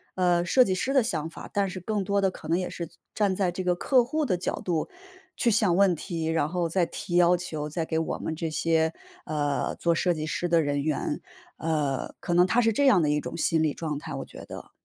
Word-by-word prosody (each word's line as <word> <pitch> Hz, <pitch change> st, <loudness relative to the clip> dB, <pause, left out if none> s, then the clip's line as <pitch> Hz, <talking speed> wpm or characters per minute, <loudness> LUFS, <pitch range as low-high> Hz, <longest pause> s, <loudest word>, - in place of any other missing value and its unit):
呃， 175 Hz, -1 st, +2 dB
设 255 Hz, +9 st, +5 dB
计 190 Hz, -, 0 dB
师 260 Hz, +8 st, -1 dB
的 265 Hz, -3 st, +4 dB
想 165 Hz, -8 st, -1 dB
法， -, -, -10 dB
但 200 Hz, -1 st, +1 dB
是 185 Hz, 0 st, -7 dB
更 210 Hz, +3 st, -1 dB
多 200 Hz, +1 st, +1 dB
的 195 Hz, -1 st, +2 dB
可 155 Hz, -, -11 dB
能 165 Hz, +2 st, +2 dB
也 185 Hz, -, -2 dB
是 170 Hz, -, -5 dB, 0.3 s
站 200 Hz, -3 st, +1 dB
在 185 Hz, -2 st, +1 dB
这 185 Hz, -, -4 dB
个 180 Hz, -1 st, +2 dB
客 250 Hz, +6 st, +3 dB
户 305 Hz, +4 st, -1 dB
的 190 Hz, -9 st, 0 dB
角 175 Hz, -, -3 dB
度 165 Hz, -4 st, -1 dB, 0.5 s
去 235 Hz, -, +2 dB
想 205 Hz, -5 st, +3 dB
问 195 Hz, -1 st, +4 dB
题， 165 Hz, -1 st, -4 dB
然 160 Hz, -2 st, +1 dB
后 170 Hz, 0 st, -1 dB
再 175 Hz, +1 st, +2 dB
提 175 Hz, +1 st, -3 dB
要 175 Hz, 0 st, +6 dB
求， 160 Hz, -4 st, -4 dB
再 165 Hz, +2 st, -2 dB
给 160 Hz, 0 st, -1 dB
我 160 Hz, -, -2 dB
们 160 Hz, -, -3 dB
这 165 Hz, 0 st, -2 dB
些， 160 Hz, +1 st, +1 dB, 0.3 s
呃， 145 Hz, -2 st, -1 dB
做 170 Hz, -, +1 dB
设 175 Hz, +2 st, +1 dB
计 155 Hz, -2 st, -4 dB
师 165 Hz, +3 st, -2 dB
的 170 Hz, -1 st, +4 dB
人 145 Hz, -1 st, 0 dB
员。 150 Hz, -1 st, -1 dB, 0.4 s
呃， 150 Hz, -4 st, -1 dB
可 175 Hz, -, -2 dB
能 175 Hz, +1 st, +5 dB
他 235 Hz, +6 st, +3 dB
是 225 Hz, -1 st, +3 dB
这 280 Hz, +6 st, +1 dB
样 245 Hz, -10 st, +6 dB
的 150 Hz, -, +1 dB
一 150 Hz, 0 st, +2 dB
种 -, -, -6 dB
心 165 Hz, -1 st, +2 dB
理 155 Hz, -2 st, +1 dB
状 155 Hz, -3 st, -4 dB
态， -, -, -7 dB
我 -, -, -4 dB
觉 -, -, -11 dB
得。 -, -, -10 dB
175 Hz, 265 characters per minute, -27 LUFS, 160-190 Hz, 0.5 s, 要